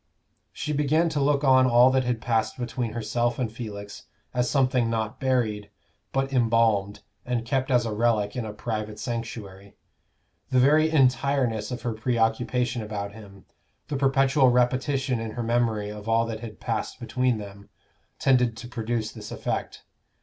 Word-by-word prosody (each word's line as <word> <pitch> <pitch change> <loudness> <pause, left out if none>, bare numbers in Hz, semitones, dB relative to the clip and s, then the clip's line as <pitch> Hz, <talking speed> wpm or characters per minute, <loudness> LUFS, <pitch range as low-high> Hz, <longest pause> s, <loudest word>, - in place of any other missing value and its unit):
She 150 0 -4
began 150 +4 +2
to 150 -3 -1
look 140 +1 +2
on 130 -1 +5
all 125 +1 +6
that 130 -1 +2
had 120 -2 -1
passed 115 0 0
between 120 -2 -3
herself 120 +1 -1
and 120 -4 -2
Felix 105 -3 -8 0.3
as 125 0 +1
something 130 -4 +2
not 110 +2 -2
buried, 115 -6 0 0.4
but 135 0 -1
embalmed 115 -4 +2 0.2
and 120 -2 -2
kept 130 +2 -1
as 125 -2 +3
a 110 - -2
relic 105 -2 +1
in 125 - -2
a 110 - -5
private 110 0 -4
sanctuary. 105 -5 -6 0.7
The 130 - +1
very 150 +5 +5
entireness 130 -5 +2
of 125 -1 -5
her 120 - -1
preoccupation 120 +1 0
about 100 -1 -5
him, 100 -3 -13 0.4
the 145 - -2
perpetual 135 0 +3
repetition 130 +1 +1
in 115 0 -4
her 120 - -3
memory 115 -3 0
of 105 +1 -8
all 115 +1 +3
that 115 -1 -5
had 110 -2 -9
passed - - -3
between 120 +1 0
them, 100 -1 -10 0.5
tended 125 -4 +2
to 120 - -8
produce 115 -2 -3
this - - -9
effect. - - -4
120 Hz, 160 wpm, -26 LUFS, 110-130 Hz, 0.7 s, all